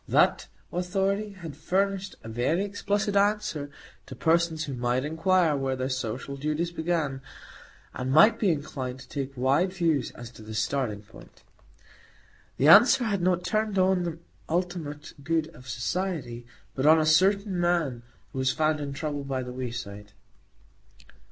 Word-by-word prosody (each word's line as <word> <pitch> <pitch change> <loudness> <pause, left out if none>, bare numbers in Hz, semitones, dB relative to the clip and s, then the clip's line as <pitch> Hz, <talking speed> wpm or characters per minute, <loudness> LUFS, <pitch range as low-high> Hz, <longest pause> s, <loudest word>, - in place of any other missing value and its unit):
That - - +3 0.3
Authority 195 +3 -1
had 165 -7 -9
furnished 195 +4 -1
a - - -9
very 125 - 0
explicit 205 0 -1
answer 200 -7 +1 0.4
to - - -8
persons 165 -1 +1
who 145 -3 -5
might 125 +1 0
inquire 165 +1 +2
where 135 -1 -1
their 130 0 -2
social 130 +1 -4
duties 155 +4 -2
began, 160 -5 -2 0.7
and 130 +1 -3
might 155 +11 +6
be 205 - +2
inclined 130 -5 -3
to - - -13
take 135 -2 -5
wide 140 +9 +2
views 165 -8 0
as 120 -1 -9
to 110 - -14
the 110 0 -8
starting 105 -3 -1
point. 105 - -17 1.1
The 140 - +3
answer 240 - +8
had 200 -5 -1
not 180 0 +1
turned 215 -2 -1
on 185 0 +3
the 170 -2 -3 0.3
ultimate 165 -4 -3
good 160 +1 0
of 125 0 -13
Society, 125 - -3 0.3
but 135 +2 0
on 160 +1 +7
"a 155 - +2
certain 190 +4 +3
man" 170 -8 0 0.3
who 130 - -4
was 130 -1 +2
found 155 +2 +1
in 140 -1 -4
trouble 145 -1 -4
by 135 -2 -3
the 125 0 -7
wayside. 115 -5 -6
155 Hz, 155 wpm, -27 LUFS, 130-185 Hz, 1.1 s, answer